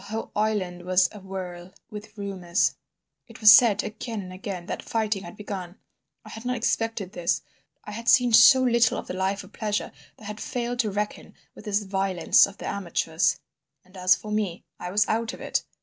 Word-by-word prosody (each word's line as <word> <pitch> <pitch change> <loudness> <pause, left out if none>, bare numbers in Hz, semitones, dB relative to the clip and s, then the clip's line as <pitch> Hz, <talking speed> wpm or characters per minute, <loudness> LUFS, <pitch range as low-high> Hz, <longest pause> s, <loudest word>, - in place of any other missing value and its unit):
The - - -13
whole 220 +2 -5
island 205 -5 -1
was 185 0 +3
awhirl 185 -3 -8 0.2
with 210 +1 -10
rumours; 190 -2 0 0.5
it 230 - -14
was 215 -1 +9
said, 220 -2 +6
again 225 +1 -5
and 185 0 -9
again, 185 -1 -6
that - - -5
fighting 215 -3 -1
had 175 +2 -11
begun. 190 -4 -6 0.5
I - - -11
had 225 - -9
not 250 0 -1
expected 225 -4 -1
this. 170 -2 -1 0.4
I - - -8
had 230 +2 -3
seen 245 -2 +5
so 260 +3 +8
little 235 -2 +3
of - - -5
the - - -6
life 190 +2 -1
of - - -16
pleasure 210 -2 -2 0.3
that - - -17
I - - -11
had 210 +1 -7
failed 245 0 -3
to 225 -4 +2
reckon 205 +1 -4 0.2
with - - -14
this 210 0 0
violence 190 -3 +3
of 200 0 -13
the - - -8
amateurs. 170 -3 0 0.5
And 185 +1 -21
as 185 0 +4
for 215 - -9
me, 205 -5 -2 0.2
I 180 - -5
was 205 +3 +2
out 230 +2 -1
of - - -10
it. - - -2
205 Hz, 200 wpm, -25 LUFS, 185-220 Hz, 0.5 s, was